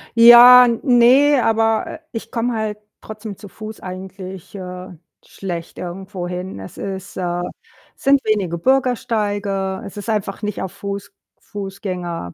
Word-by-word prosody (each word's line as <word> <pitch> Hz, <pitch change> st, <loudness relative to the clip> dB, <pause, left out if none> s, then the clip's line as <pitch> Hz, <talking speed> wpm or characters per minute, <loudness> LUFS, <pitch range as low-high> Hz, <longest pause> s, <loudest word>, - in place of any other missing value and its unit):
Ja, 240 Hz, +2 st, +10 dB, 0.2 s
ne, 255 Hz, +3 st, +5 dB
aber, 225 Hz, 0 st, +2 dB
äh, 320 Hz, -, -8 dB
ich 225 Hz, 0 st, -7 dB
komme 240 Hz, 0 st, -1 dB
halt 215 Hz, -2 st, -3 dB, 0.2 s
trotzdem 215 Hz, -2 st, -8 dB
zu 205 Hz, -, -11 dB
Fuß 215 Hz, +3 st, -9 dB
eigentlich, 190 Hz, 0 st, -9 dB
äh, 180 Hz, -1 st, -7 dB, 0.4 s
schlecht 175 Hz, -3 st, -7 dB
irgendwohin. 180 Hz, -, -6 dB
Es 95 Hz, -, -10 dB
ist 195 Hz, 0 st, -6 dB
äh, 175 Hz, -1 st, -2 dB, 0.5 s
sind 275 Hz, 0 st, +3 dB
wenige 195 Hz, -6 st, 0 dB
Bürgersteige. 205 Hz, -6 st, 0 dB
Es 200 Hz, -, -10 dB
ist 205 Hz, +2 st, -6 dB
einfach 210 Hz, -2 st, -2 dB
nicht 210 Hz, -1 st, -3 dB
auf 190 Hz, -, -4 dB
Fuß 200 Hz, 0 st, -6 dB, 0.3 s
Fußgänger 185 Hz, -, -6 dB
200 Hz, 130 wpm, -19 LUFS, 185-225 Hz, 0.5 s, Ja